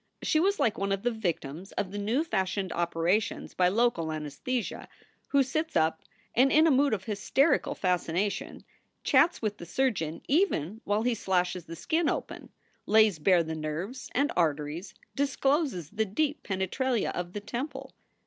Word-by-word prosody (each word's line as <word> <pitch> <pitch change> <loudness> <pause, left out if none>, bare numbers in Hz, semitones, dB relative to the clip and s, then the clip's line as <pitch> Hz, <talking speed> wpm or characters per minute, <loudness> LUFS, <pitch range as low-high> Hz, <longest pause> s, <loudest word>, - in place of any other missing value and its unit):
She 310 - +2
was 395 +4 +2
like 220 - +1
one 195 0 -1
of 195 0 -1
the 245 - +2
victims 175 -5 -4
of 190 - -2
the 205 - -4
new 225 +9 +1
fashioned 190 - -1
operations 170 +4 0
by 180 - +3
local 195 -5 +1
anaesthesia 155 - -4 0.4
who 280 -1 +4
sits 310 +5 -2
up 160 0 +2 0.3
and 265 +3 +4
in 310 +1 +6
a 325 - +5
mood 275 -3 +3
of 190 - -8
hysterical 220 +9 +1
fascina 180 +1 0
tion - - -8 0.4
chats 340 -7 +3
with 210 -1 -2
the 170 - -7
surgeon 175 -8 -1
even 225 - +1
while 205 +2 +1
he 245 0 +2
slashes 180 -4 -1
the 165 - -8
skin 320 - 0
open, - - -4 0.4
lays 215 -5 +5
bare 175 +2 +4
the 160 0 -4
nerves 160 - -5
and 285 +3 +2
arteries, 155 +1 -1 0.2
discloses 275 - 0
the 220 +1 0
deep 290 +9 -1
penetralia 210 +5 -1
of 175 0 -5
the 205 - -3
temple. 240 +8 -5
205 Hz, 165 wpm, -29 LUFS, 175-260 Hz, 0.4 s, in